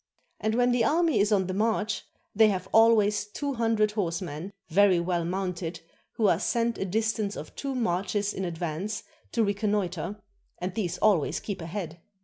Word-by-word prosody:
And 220 +1 0
when 245 +1 +3
the 245 -1 +2
army 325 +3 +3
is 205 +2 +2
on 195 -3 +3
the 185 - -3
march, 215 +1 0 0.3
they 220 +1 +6
have 185 -3 -1
always 220 -2 +5
two 280 +6 -3
hundred 225 -3 +2
horsemen, 175 -3 -3 0.2
very 190 +1 +4
well 170 0 0
mounted, 180 -2 -3 0.3
who 220 - 0
are 170 -3 +3
sent 235 +1 0
a - - -1
distance 215 +1 -1
of - - -8
two 275 -1 -3
marches 200 -1 0
in 190 - -4
advance 175 +5 -3 0.3
to 230 - +3
recon 205 0 0
noitre, 190 0 -2 0.4
and 180 +1 -4
these 180 -4 -2
always 195 -9 +2
keep 200 -4 -5
ahead. 170 -1 -5
205 Hz, 170 wpm, -27 LUFS, 180-220 Hz, 0.4 s, they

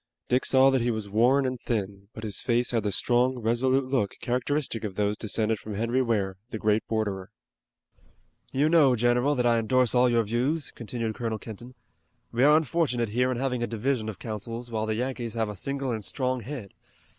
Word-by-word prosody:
Dick 125 +1 +2
saw 135 0 +5
that 130 -2 +2
he 120 - +1
was 110 -3 -2
worn 125 +7 +3
and 130 -2 -3
thin, 100 -3 -3
but 110 - -8
his 105 -2 -2
face 120 0 +1
had 115 -2 +1
the 105 -1 -1
strong 125 +5 +2
and 120 - -8
resolute 130 +4 +2
look 130 -6 -1
characteristic 125 0 -1
of 100 -3 -4
those 105 0 0
descended 110 0 0
from 105 -1 -7
Henry 115 +5 +1
Ware, 100 -6 -1
the 110 - -4
great 105 0 +1
borderer. 100 -4 -2 1.2
"You 140 +3 +2
know, 155 -6 +5
general, 120 +5 +2
that 125 -2 0
I 120 -1 +4
endorse 125 +2 +2
all 125 0 +4
your 115 -1 +3
views," 130 +8 -1
continued 115 -1 -4
Colonel 115 -1 -3
Kenton. 120 +4 -10 0.6
"We 120 +2 +1
are 150 +2 +7
unfortunate 140 -7 0
here 125 +4 +1
in 125 - -2
having 125 -1 -1
a 120 - 0
division 115 0 -1
of 105 - -7
counsels, 115 +2 -6
while 110 -1 -2
the 110 - 0
Yankees 120 -1 -3
have 110 -2 -1
a 105 - -6
single 135 +5 -3
and 110 -2 -3
strong 130 +3 -1
head. 125 -6 -7
120 Hz, 205 wpm, -27 LUFS, 110-130 Hz, 1.2 s, are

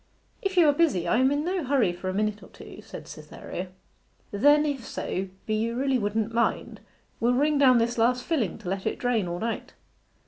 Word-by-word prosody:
'If 385 -1 -3
you 335 -3 +6
are 290 - +5
busy 285 - +1
I - - +2
am 260 +1 +4
in 290 +2 -1
no 365 -1 -1
hurry 260 -9 +2
for 185 +2 -5
a - - -2
minute 210 0 -1
or - - -14
two,' - - -12
said - - -10
Cytherea. 185 +2 -8 0.6
'Then 290 +8 +4
if 280 -4 -2
so 190 -3 -4 0.2
be 215 - -2
you 225 +2 -1
really 265 0 +1
wouldn't 215 +1 -1
mind, 235 0 -1 0.4
we'll 240 +2 +2
wring 295 +2 +2
down 255 -3 +6
this 235 +1 0
last 245 +2 +2
filling 260 - -1
to - - -11
let 190 0 -2
it - - -2
drain 235 -6 0
all 175 0 -3
night? 225 +4 -4
240 Hz, 210 wpm, -26 LUFS, 210-285 Hz, 0.6 s, you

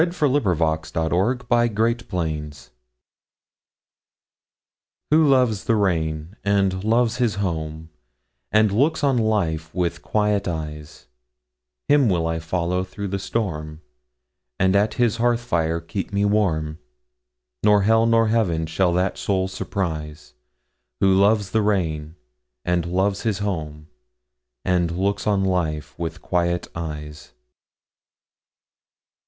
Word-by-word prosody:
Who 170 -2 +1
Loves 145 +2 +2 0.5
the 80 -1 -1
Rain 110 +8 +1
By 120 0 +3
Frances 115 +2 -1
Shaw 75 -5 -4 2.4
WHO 155 0 +5
loves 125 -7 +2
the 115 - +2
rainAnd 95 +1 0
loves 115 +2 +2
his 120 -6 +1
home, 80 -4 -4 0.6
And 110 -1 +4
looks 150 +9 +1
on 135 -4 +3
life 85 -8 0
with 90 -2 -1
quiet 105 -2 0
eyes, 75 -3 -6 0.8
Him 145 -5 +4
will 85 -3 +1
I 80 0 -1
follow 90 +2 -1
through 95 +2 -6
the 100 +1 -2
storm; 80 -8 -4 0.7
And 95 +1 +2
at 105 +2 +2
his 120 -3 +1
hearth 120 0 +2
fire 85 -8 0
keep 85 +4 -5
me 100 +1 +1
warm; 80 -7 0 0.8
Nor 105 -1 +4
hell 115 +2 +4
nor 115 -1 +3
heaven 90 -8 +1
shall 85 +3 +1
that 90 +2 0
soul 95 -2 0
surprise, 80 -8 -4 0.7
Who 95 -1 +4
loves 100 0 +3
the 110 - +2
rain, 80 -7 -1 0.5
And 90 -1 0
loves 95 +3 0
his 110 -4 0
home, 80 -7 -4 0.8
And 90 -2 +2
looks 100 +3 -1
on 100 -2 +2
life 80 -5 -1
with 85 0 -5
quiet 85 -1 0
eyes. 75 -3 -7
95 Hz, 120 wpm, -22 LUFS, 80-110 Hz, 2.4 s, WHO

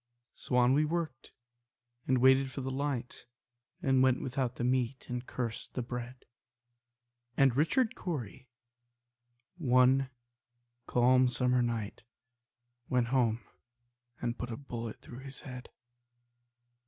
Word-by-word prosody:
So 125 - -4
on 125 +1 +5
we 150 +3 +4
worked, 155 -4 -3 0.8
and 130 - +3
waited 130 +1 +5
for 135 - -5
the 130 +1 -3
light, 130 -3 -3 0.6
And 135 -1 +4
went 130 -1 +4
without 130 -1 -2
the - - -3
meat, 125 +1 0
and 125 0 -3
cursed 115 -3 -4
the 125 - -1
bread; 125 +1 -7 1.1
And 135 -4 +5
Richard 220 - +2
Cory, 130 - -5 1.1
one 130 -1 +4 0.8
calm 125 +1 +4
summer 125 0 +2
night, 115 -3 -2 0.9
Went 125 -2 +1
home 120 -3 +2 0.8
and 120 0 -3
put 125 - -4
a 115 - -4
bullet 115 -5 -6
through 120 - -10
his 135 0 -9
head. 125 -2 -9
125 Hz, 120 wpm, -31 LUFS, 120-135 Hz, 1.1 s, on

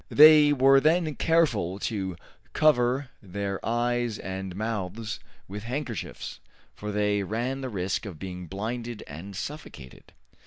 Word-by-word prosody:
They 150 0 +8
were 135 0 +6
then 155 +2 +2
careful 130 - +2
to 95 -4 -3 0.4
cover 130 -3 +3
their 100 0 -4
eyes 120 -1 0
and 95 -1 -5
mouths 105 0 -3 0.3
with 105 +2 -6
handkerchiefs, 120 - -5 0.3
for 105 0 -5
they 105 0 +1
ran 120 +7 -2
the 130 - -3
risk 95 0 -2
of 90 -6 -8
being 90 0 -7
blinded 115 +5 -4
and 90 +7 -9
suffocated. 95 - -8
110 Hz, 125 wpm, -27 LUFS, 95-130 Hz, 0.4 s, They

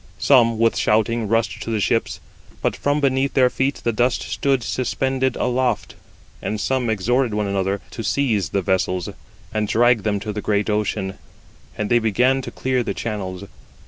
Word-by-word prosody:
Some 115 -3 +4
with 115 0 +2
shouting 110 +1 +1
rushed 115 +2 0
to - - -5
the 110 -1 0
ships, 115 +3 0 0.4
but - - +1
from 145 +1 0
beneath 135 0 +1
their 125 -2 +4
feet 135 +2 -1
the 115 - +1
dust 120 +3 +1
stood 135 -3 0
suspended 130 +2 -1
aloft; 125 -2 0 0.5
and 110 - -3
some 125 +2 0
exhorted 115 +3 +1
one 105 0 0
another 100 0 -1
to 115 - -6
seize 110 - 0
the 100 - -1
vessels, 90 -1 0 0.4
and 110 -1 0
drag 120 0 +3
them 105 0 0
to 105 0 -4
the 105 - -4
great 105 +1 0
ocean; 100 -2 -2 0.6
and 105 +1 -2
they 120 - +5
began 125 +4 +2
to - - -6
clear 130 -1 -1
the - - -3
channels. 100 -4 -4
115 Hz, 175 wpm, -21 LUFS, 105-130 Hz, 0.6 s, they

